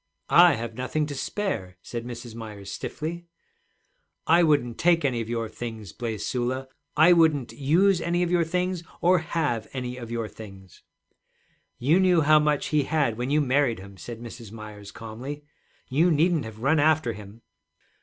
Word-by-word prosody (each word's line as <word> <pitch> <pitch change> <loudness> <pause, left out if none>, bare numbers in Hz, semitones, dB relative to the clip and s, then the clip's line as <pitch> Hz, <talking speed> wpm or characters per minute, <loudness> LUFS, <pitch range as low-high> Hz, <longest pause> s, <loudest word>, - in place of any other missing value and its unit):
'I 170 -2 +7
have 115 -1 -5
nothing 130 +6 -1
to 145 - -6
spare,' 130 - -3
said 120 -1 -6
Mrs. 120 -1 -8
Myers 105 -3 -8
stiffly. 170 +3 -5 1.0
'I 170 +2 +5
wouldn't 145 -8 +2
take 170 -3 +3
any 125 -4 0
of 115 - -6
your 115 -1 -2
things,' 110 -5 -7
blazed 115 -4 -4
Sula. 130 +1 -2 0.3
'I 160 +4 +7
wouldn't 160 -7 +3
use 175 +6 +3
any 175 +1 +1
of 175 - -1
your 175 -1 +3
things, 180 +1 -1 0.2
or 180 +1 +4
have 155 -8 -2
any 125 -1 -4
of 120 -2 -8
your 115 -2 -3
things.' 95 -4 -13 1.0
'You 150 +9 +3
knew 180 -3 +4
how 155 +1 +6
much 150 -1 +1
he 150 -3 +2
had 145 -7 +1
when 125 +3 -3
you 150 +2 +3
married 135 -3 +2
him,' 100 +1 -11
said 115 +3 -8
Mrs. 115 -2 -9
Myers 105 -2 -10
calmly. 125 +7 -7 0.4
'You 155 +7 +3
needn't 160 -2 +2
have 110 +1 -9
run 155 +4 +3
after 155 -5 +3
him.' 105 +2 -12
130 Hz, 170 wpm, -26 LUFS, 115-160 Hz, 1.0 s, I